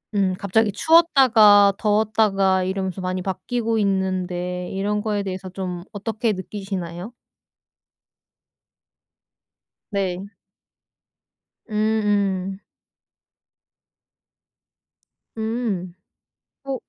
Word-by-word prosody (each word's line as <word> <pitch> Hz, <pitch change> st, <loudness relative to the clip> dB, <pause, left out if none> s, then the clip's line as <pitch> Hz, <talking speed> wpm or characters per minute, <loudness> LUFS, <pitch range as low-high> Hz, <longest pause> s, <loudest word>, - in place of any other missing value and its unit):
음 190 Hz, -2 st, +1 dB
갑자기 205 Hz, +2 st, +1 dB
추웠다가 225 Hz, -, +5 dB
더웠다가 205 Hz, -3 st, +2 dB
이러면서 190 Hz, 0 st, -3 dB
많이 185 Hz, 0 st, -2 dB
바뀌고 225 Hz, +5 st, -2 dB
있는데 180 Hz, -2 st, -1 dB
이런 205 Hz, +2 st, -1 dB
거에 210 Hz, -2 st, -1 dB
대해서 190 Hz, -1 st, -5 dB
좀 180 Hz, -2 st, -5 dB
어떻게 215 Hz, +2 st, -2 dB
느끼시나요? 190 Hz, -1 st, -6 dB, 2.8 s
네. 190 Hz, -1 st, -2 dB, 1.4 s
음음. 205 Hz, -3 st, 0 dB, 2.8 s
음. 220 Hz, -6 st, -3 dB, 0.7 s
어. 275 Hz, -1 st, -3 dB
195 Hz, 160 characters per minute, -22 LUFS, 185-215 Hz, 2.8 s, 추웠다가